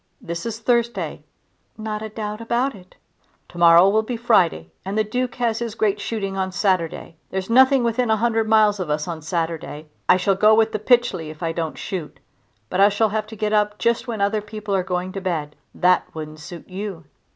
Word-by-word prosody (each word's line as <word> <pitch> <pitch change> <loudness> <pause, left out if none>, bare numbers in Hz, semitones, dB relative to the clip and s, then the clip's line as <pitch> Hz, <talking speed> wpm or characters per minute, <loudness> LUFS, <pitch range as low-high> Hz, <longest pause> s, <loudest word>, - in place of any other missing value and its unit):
This 170 +6 -5
is 225 -1 -4
Thursday." 235 0 -1 0.6
"Not 215 -1 -4
a 220 - -5
doubt 215 0 -5
about 240 +4 0
it." 185 -3 -16 0.5
"To 175 - -10
morrow 170 +2 +7
will 215 +2 +3
be 235 +2 -4
Friday 180 - +2
and 195 +3 -4
the 215 - +3
Duke 250 +4 -2
has 230 -3 0
his 230 -2 -4
great 210 -2 0
shooting 200 -4 -3
on 190 -1 -2
Saturday. 180 -4 -1
There's 190 +3 -4
nothing 260 +1 +5
within 235 +1 0
a 220 - +4
hundred 225 -1 +1
miles 215 -2 +4
of 180 -4 -3
us 150 +1 -1
on 165 -2 -5
Saturday. 160 -2 -4 0.2
I 180 - +7
shall 190 +2 +2
go 215 +3 +5
with 225 0 +3
the 215 - -2
Pytchley 240 -8 +2
if 155 +2 -9
I 165 - 0
don't 165 -1 -4
shoot, 175 -6 -6 0.5
but 180 - -3
I 200 +1 +7
shall 215 +2 +1
have 215 0 -2
to 220 - -9
get 215 0 -1
up 210 0 +2
just 235 +2 0
when 225 -4 -3
other 205 +2 +1
people 210 -1 -6
are 190 - +2
going 180 0 -3
to 195 - -5
bed. 160 -5 -3 0.2
That 180 0 +3
wouldn't 155 -1 -7
suit 170 +3 -10
you." 190 -3 -6
205 Hz, 210 wpm, -22 LUFS, 180-220 Hz, 0.6 s, morrow